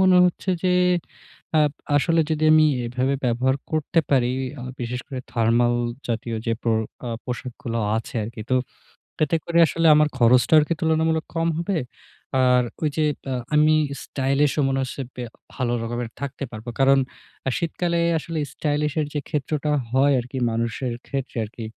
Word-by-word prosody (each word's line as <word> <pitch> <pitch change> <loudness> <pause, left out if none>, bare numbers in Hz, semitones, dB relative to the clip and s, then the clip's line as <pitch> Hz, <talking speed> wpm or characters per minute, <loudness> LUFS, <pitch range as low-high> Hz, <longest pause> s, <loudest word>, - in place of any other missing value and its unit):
মনে 185 -1 +6
হচ্ছে 180 +2 0
যে, 185 - +2 0.9
আব 150 -1 +3 0.2
আসলে 165 +3 +3
যদি 155 -1 0
আমি 155 0 +6 0.2
এভাবে 130 +3 0
ব্যবহার 125 +2 +2 0.2
করতে 155 +1 +1
পারি, 125 -3 +3 0.3
আ - - -6 0.2
বিশেষ 125 +1 -3
করে 135 -3 -5
থার্মাল 120 +1 +3 0.3
জাতীয় 115 0 -2
যে, 115 - +1
পো 115 - 0 0.4
আ - - -3
পোশাকগুলো 120 -2 -5 0.2
আছে 115 - -7
আর 105 - -5
কি। 110 - -6
তো, - - +4 0.7
এতে 155 +3 +1
করে 170 0 +2
আসলে 165 +1 +1
আমার 150 0 +5
খরচটা 125 +3 +4
আর - - +4
কি 170 - +1
তুলনামূলক 160 0 +1
কম 165 0 +1
হবে? 170 +2 -1 0.7
আর 125 -1 +4 0.2
ঐ - - -2
যে 155 - +3 0.3
আ - - 0 0.2
আমি 155 +1 +5 0.3
স্টাইলিশ 140 +1 +1
ও - - +2
এমন 135 0 +1
আছে 130 +1 -5
ব্যা 125 -1 -5 0.3
ভালো 120 -2 -1
রকমের 120 0 -3
থাকতে 140 0 -5
পারবো। 110 +1 -7
কারণ 135 0 +5 0.5
আ - - +3
শীতকালে 170 0 -1 0.2
আসলে 160 0 -4
স্টাইলিশের 150 0 0
যে 150 - 0
ক্ষেত্রটা 150 0 -1 0.2
হয় 135 +2 +4
আর 120 - -4
কি, 135 - -4
মানুষের 115 +2 -2
ক্ষেত্রে 135 -3 -4
আর 105 - -6
কি। 115 - -6
135 Hz, 170 wpm, -23 LUFS, 120-155 Hz, 0.9 s, মনে